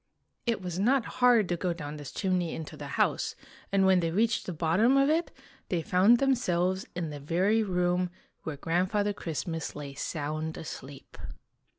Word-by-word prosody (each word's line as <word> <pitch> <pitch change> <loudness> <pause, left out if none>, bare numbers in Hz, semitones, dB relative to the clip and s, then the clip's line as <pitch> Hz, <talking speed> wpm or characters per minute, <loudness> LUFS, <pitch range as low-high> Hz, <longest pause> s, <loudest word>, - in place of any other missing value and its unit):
It 230 -5 0
was 180 0 -4
not 245 +4 +3 0.2
hard 240 -5 +6
to 175 - +1
go 175 +1 -1
down 150 -3 -7
this 145 -2 -8
chimney 180 -4 -1
into 160 - -7
the - - -7
house, - - +1 0.4
and 195 -1 +3
when 190 -1 +5
they 165 -1 0
reached 220 +6 +1
the - - -2
bottom 175 - +3
of 275 +2 +4
it 330 +2 +1 0.4
they 170 -3 0
found 195 +9 +5
themselves 190 -9 +1
in 170 -3 -3
the 145 - -6
very 185 +9 +2
room 180 -2 +1 0.3
where 155 -3 -5
Grandfather 185 +6 0
Christmas 165 -2 -4
lay 145 -2 -6
sound 155 +2 -3
asleep. 140 -3 -9
180 Hz, 170 wpm, -29 LUFS, 160-210 Hz, 0.4 s, hard